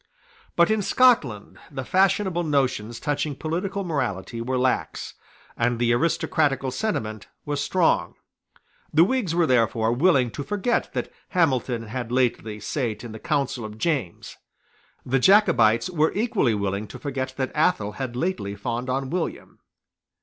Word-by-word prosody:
But 170 +4 +4
in 220 -1 +2
Scotland 195 - +2
the 135 -4 -6
fashionable 190 0 +2
notions 130 -7 0
touching 145 -1 -2
political 185 +7 -3
morality 120 - -3
were 130 +2 -1
lax; 125 0 -1 0.4
and 120 +1 +1
the 120 0 +2
aristocratical 145 -1 +1
sentiment 110 - -3 0.2
was 145 -1 -2
strong. 180 0 +1 0.8
The 160 +2 +6
Whigs 200 -5 0
were 175 -1 +3
therefore 115 -3 +2
willing 130 -3 +3
to 140 - -5
forget 205 - -1
that - - -4 0.2
Hamilton 130 - +1
had 120 +1 -5
lately 120 -4 0
sate 115 -1 -3
in 120 - -7
the 110 - -8
council 135 -2 -1
of 110 0 -7
James. 130 - -2 0.7
The 135 +2 +1
Jacobites 170 - +4
were 160 -4 +1
equally 205 - +1
willing 100 +1 -2
to - - -9
forget 130 -2 -4
that 130 -1 -2
Athol 150 - +2
had 130 0 -5
lately 120 - -2
fawned 120 +4 -4
on 135 +1 -2
William. 180 -1 -4
135 Hz, 140 wpm, -24 LUFS, 115-170 Hz, 0.8 s, The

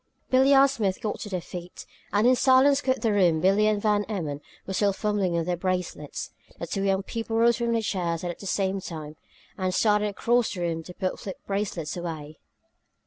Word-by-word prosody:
Billie 265 +2 +5
and 275 +1 +7
Smith 210 -9 -1
got 215 - -3
to 205 - -6
their 185 -2 -2
feet, 175 +1 -9 0.3
and 205 +3 +2
in 255 +1 +6
silence 265 +2 +5
quit 260 -2 0
the 225 -2 +2
room 175 -5 +3
Billie 195 +5 +3
and 215 -1 +2
Van 210 0 +2
Emmon 155 -9 -4 0.2
were 190 - -4
still 200 +1 +2
fumbling 205 -3 0
with 170 -1 0
their 180 0 0
bracelets. 180 -4 -3 0.3
The - - -5
two 195 +4 -3
young 195 0 +1
people 225 +1 -3
rose 235 +1 +4
from 235 -1 0
the 225 -1 0
chairs 175 -5 -2
at 175 -1 -4
the 200 - -7
same 195 0 0
time 155 -4 -7 0.4
and 185 -1 0
started 210 -1 +3
across 235 +3 +1
the 180 - -5
room 165 -1 -1
to 180 - -10
put 185 -1 -2
flip 190 - -6
bracelets 195 -6 -3
away. 160 -4 -6
195 Hz, 205 wpm, -26 LUFS, 175-225 Hz, 0.4 s, and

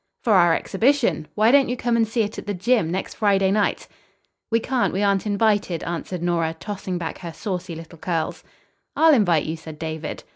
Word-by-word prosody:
"For 225 - +3
our 175 -3 +5
exhibition. 230 - +1
Why 215 +2 +4
don't 275 -2 +5
you 250 - -2
come 240 -1 0
and 225 -1 +2
see 225 +1 0
it 210 +1 -5
at - - -11
the 205 - -2
gym. 210 -2 +1
next 185 +2 -3
Friday 195 -2 +2
night?" 205 0 0 0.6
"We 230 - +2
can't. 250 +1 0
We 195 +3 -1
aren't 200 0 +1
invited," 205 -4 +1
answered 175 +1 -4
Nora, 165 -2 0
tossing 195 -3 -4
back 170 -2 -5
her 170 -2 -7
saucy 180 0 -5
little 165 0 -11
curls. 165 -2 -3 0.5
"I'll 320 -1 +6
invite 175 - +3
you," 160 - -3
said 160 -1 -10
David. 160 0 -5
195 Hz, 195 wpm, -23 LUFS, 170-220 Hz, 0.6 s, I'll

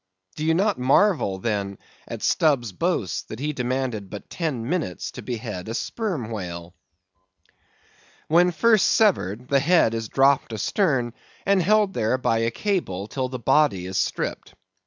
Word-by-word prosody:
Do 150 - -4
you 160 +1 +2
not 200 -2 +1
marvel, 135 - +3
then, 100 -1 -2 0.3
at - - -7
Stubb's 135 -9 +2
boast, 140 - -2
that 110 - -6
he 150 +4 -2
demanded 125 -6 -2
but 105 - -9
ten 140 -9 -3
minutes 150 - -3
to - - -9
behead 110 -5 -5
a 115 - -3
sperm 170 - -3
whale? 90 -4 -6 1.5
When 175 +3 +4
first 220 +4 +3
severed, 125 - +2
the 140 - +4
head 150 -5 +3
is 115 -1 -4
dropped 135 -3 +3
astern 125 - 0 0.3
and 195 -1 +3
held 205 +2 +3
there 110 -1 +1
by 115 -3 +1
a 115 0 +1
cable 115 - -2
till 130 +2 -3
the 130 - -5
body 125 -7 +2
is 95 0 -4
stripped. 95 - -2
130 Hz, 155 wpm, -24 LUFS, 110-170 Hz, 1.5 s, When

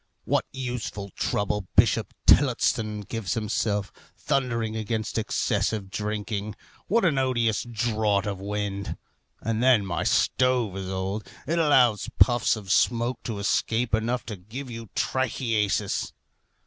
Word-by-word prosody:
What - - +1
useful 120 -6 -5
trouble 105 0 -1
Bishop 105 -1 +4
Tillotson 115 -5 +3
gives 105 -2 -3
himself, 105 -2 -1 0.2
thundering 115 -5 -1
against 110 0 -2
excessive 105 -2 -1
drinking. 105 0 -3 0.3
What 225 0 +3
an 150 -6 +3
odious 120 -4 +1
draught 110 -3 0
of 100 -2 -3
wind! 100 0 -3 0.4
And 115 0 -1
then 125 -5 +5
my 85 -2 -2
stove 125 -6 +2
is 95 -1 -4
old. 95 +3 -3 0.2
It 170 +4 0
allows 130 -9 +4
puffs 120 -2 +4
of 100 -3 -6
smoke 120 +2 +2
to 110 -3 -3
escape 115 +3 0
enough 115 +3 0
to 110 - -5
give 120 +8 -8
you 115 -2 -8
trichiasis. 115 -5 0
110 Hz, 125 wpm, -26 LUFS, 105-120 Hz, 0.4 s, then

